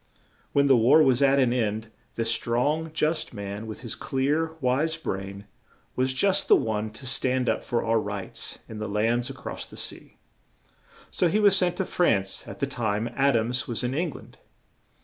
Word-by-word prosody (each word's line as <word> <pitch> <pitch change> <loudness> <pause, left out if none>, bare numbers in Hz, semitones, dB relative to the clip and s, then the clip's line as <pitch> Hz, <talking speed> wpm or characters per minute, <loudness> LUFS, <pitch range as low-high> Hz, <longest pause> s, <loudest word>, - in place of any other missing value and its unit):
When 140 0 +3
the 135 -1 +6
war 130 +7 +6
was 130 -2 +3
at 140 0 +4
an 125 -3 +3
end, 110 -2 -2 0.2
this 115 0 0
strong, 145 +8 0
just 155 -4 -1
man, 100 +2 -6
with 110 - -7
his 120 -3 -5
clear, 150 +5 -1
wise 145 +5 +1
brain, 100 -8 -5 0.5
was 130 +1 +1
just 185 +9 +2
the - - +7
one 110 -1 -1
to 130 - -10
stand 130 0 +1
up - - 0
for 120 -2 -1
our 115 0 +2
rights 100 -2 -5
in 110 - -8
the 110 0 -4
lands 115 +5 0
a - - -6
cross - - -6
the - - -12
sea, - - -5 0.9
so 180 - +2
he 205 +6 +1
was 205 -2 +6
sent 180 -2 +3
to 190 - -2
France 100 - 0
at - - -8
the 140 - 0
time 115 -4 -2
Ad 140 -1 +3
ams 125 +5 -1
was 120 0 -3
in 125 +1 -1
Eng 165 +4 0
land. 140 - -12
125 Hz, 190 wpm, -26 LUFS, 110-145 Hz, 0.9 s, the